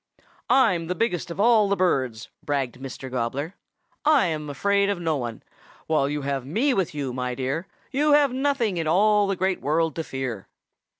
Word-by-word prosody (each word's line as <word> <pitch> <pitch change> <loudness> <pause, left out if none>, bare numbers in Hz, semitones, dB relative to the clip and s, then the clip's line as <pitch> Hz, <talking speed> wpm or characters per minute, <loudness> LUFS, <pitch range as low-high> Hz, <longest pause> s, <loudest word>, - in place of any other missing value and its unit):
"'I'm 185 -11 +3
the 180 - -2
biggest 180 -4 -1
of 170 - -7
all 215 -2 +4
the 200 - +2
birds,' 130 - 0
bragged 135 -4 -2
Mr. 135 0 -7
Gobbler. 130 +7 -2 0.5
'I'm 175 - +2
afraid 200 +7 +1
of 200 -3 -1
no 165 -2 0
one. 120 -5 -5 0.4
While 150 -3 +1
you 145 -1 -3
have 135 -2 -2
me 225 - +1
with 185 -6 -1
you, 135 -4 -3
my 125 0 -3
dear, 135 +8 -3 0.2
you 295 +2 +3
have 290 -3 +4
nothing 260 -7 0
in 165 -2 -1
all 205 +4 +4
the 195 - 0
Great 185 0 -1
World 160 +3 0
to 165 - -1
fear.' 130 -8 -5
165 Hz, 180 wpm, -24 LUFS, 135-200 Hz, 0.5 s, all